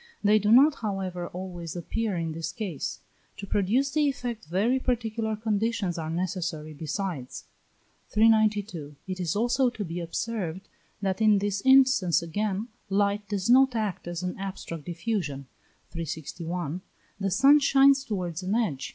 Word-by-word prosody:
They 210 +1 +5
do 210 +1 +1
not, 280 +6 +7
however, 190 -5 -3
always 175 -3 -7
appear 205 +4 -2
in 165 -1 -2
this 165 +1 -4
case; 190 -10 -5 0.4
to 200 - -6
produce 215 +8 +1
the 300 -1 +2
effect 240 - -5
very 210 +10 +1
particular 225 -3 -1
conditions 215 -4 -1
are 160 -1 -4
necessary 170 -2 -3
besides. 155 -2 -4 0.7
392. 210 -8 +2
It 185 -1 -4
is 175 -1 -1
also 245 +4 +2
to 220 -4 -5
be 170 +1 -5
observed 185 0 -4 0.4
that 190 +2 -1
in 215 -2 +5
this 200 0 -1
instance 260 - +5
again 205 +5 -2 0.2
light 200 +1 0
does 200 -1 -1
not 260 +1 +5
act 210 -6 -2
as 175 0 -4
an 180 - -3
abstract 185 -5 -6
diffusion 170 -6 -3 0.5
(361), 165 +1 -4 0.4
the 195 0 0
sun 275 +10 +6
shines 275 -1 +5
towards 180 - -3
an 190 +3 -1
edge. 170 - -1
195 Hz, 145 wpm, -27 LUFS, 175-225 Hz, 0.7 s, not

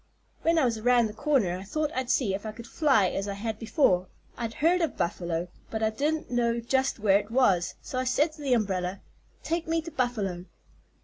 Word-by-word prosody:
"When 330 0 +2
I 310 - +4
was 230 -3 0
around 245 +1 +4
the 215 - -4
corner 220 - +1
I - - -8
thought 305 +9 -2
I'd 260 -1 -2
see 220 -8 +2
if 195 - -4
I 215 - -4
could 235 +1 -10
fly 250 - +3
as 195 +1 -3
I 200 - -3
had 220 +1 -4
before. 215 - +2 0.3
I'd 230 -1 -4
heard 345 +4 +3
of 325 -4 -1
Buffalo, 170 0 -2 0.2
but 220 0 -3
I 220 - +2
didn't 300 +7 -1
know 235 -1 +1
just 265 +3 0
where 200 -2 +4
it 205 +1 -8
was; 200 -8 +2
so 255 - -3
I - - 0
said 295 +5 +2
to 310 - -13
the 270 -3 +1
umbrella: 190 -4 -1 0.4
'Take 330 0 -2
me 330 0 +1
to 330 - -7
Buffalo.' 210 - -2
235 Hz, 220 wpm, -27 LUFS, 200-275 Hz, 0.4 s, I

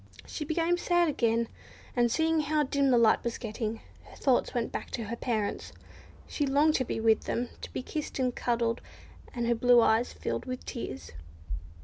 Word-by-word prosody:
She - - -5
became 335 +3 +1
sad 350 -1 +3
again; 230 -4 +1 0.5
and 240 -1 +3
seeing 320 +2 +2
how 305 0 +1
dim 280 0 +1
the 250 - +5
light 230 -2 +4
was 235 -1 -2
getting, 225 -1 -4 0.2
her - - -14
thoughts 260 -3 +2
went 235 -2 -2
back - - -5
to 230 - -4
her 220 +2 -4
parents. 220 -4 -2 0.5
She 290 - -1
longed 290 +3 +4
to 260 - +1
be 235 - -3
with 225 0 +3
them 240 0 -1
to - - -7
be - - -4
kissed 305 +2 -4
and 255 -2 0
cuddled, 235 -1 0 0.5
and 240 -1 -1
her 235 - +3
blue 245 +1 +5
eyes 225 +1 +3
filled - - -4
with 255 0 -5
tears. 90 - -6
245 Hz, 190 wpm, -29 LUFS, 230-285 Hz, 0.5 s, the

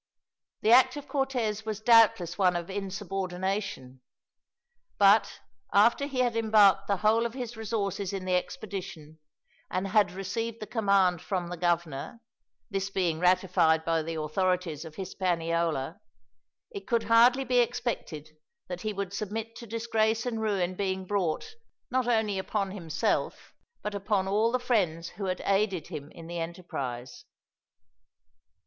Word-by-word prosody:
The 220 - +3
act 255 +4 +6
of 290 0 -8
Cortez 245 -7 -1
was 215 -2 -4
doubtless 220 -7 +5
one 185 -2 +3
of 175 +2 -4
insubordination; 190 -7 -4 1.0
but, 205 +2 +4 0.3
after 235 +7 +4
he 265 -3 -1
had 240 -2 +1
embarked 210 -3 +4
the 200 - +1
whole 225 +2 +4
of 235 0 -3
his 245 -3 -5
resources 205 -3 -2
in 195 -2 -4
the 185 - 0
expedition, 180 -5 -5 0.5
and 185 +2 -2
had 205 0 +3
received 225 +5 -4
the 215 - -5
command 200 -6 +2
from 180 -3 -3
the 175 - -4
governor, 170 - -2 0.5
this 195 0 -2
being 175 -5 0
ratified 180 -3 +3
by 165 -1 +1
the 165 +1 -5
authorities 175 0 -1
of 160 -1 -10
Hispaniola, 170 -6 -1 0.7
it 200 -1 -8
could 235 -1 +1
hardly 245 +3 +5
be 250 -1 +2
expected 235 - -2 0.4
that 180 -1 -5
he 215 -1 -2
would 200 -1 -4
submit 220 +3 -4
to 235 - -9
disgrace 225 0 0
and 230 -3 -2
ruin 195 -4 0
being 190 0 -2
brought, 200 - -2 0.4
not 255 -1 +1
only 220 -4 +1
upon 195 0 -2
himself, 165 -5 -2 0.3
but 210 - -3
upon 200 -1 0
all 215 +4 +2
the 255 - +2
friends 190 -10 0
who 200 +1 -6
had 185 -1 -2
aided 195 -4 +1
him 145 0 -7
in 165 - -12
the 170 +1 -5
enterprise. 165 - -6
195 Hz, 145 wpm, -28 LUFS, 175-220 Hz, 1.0 s, act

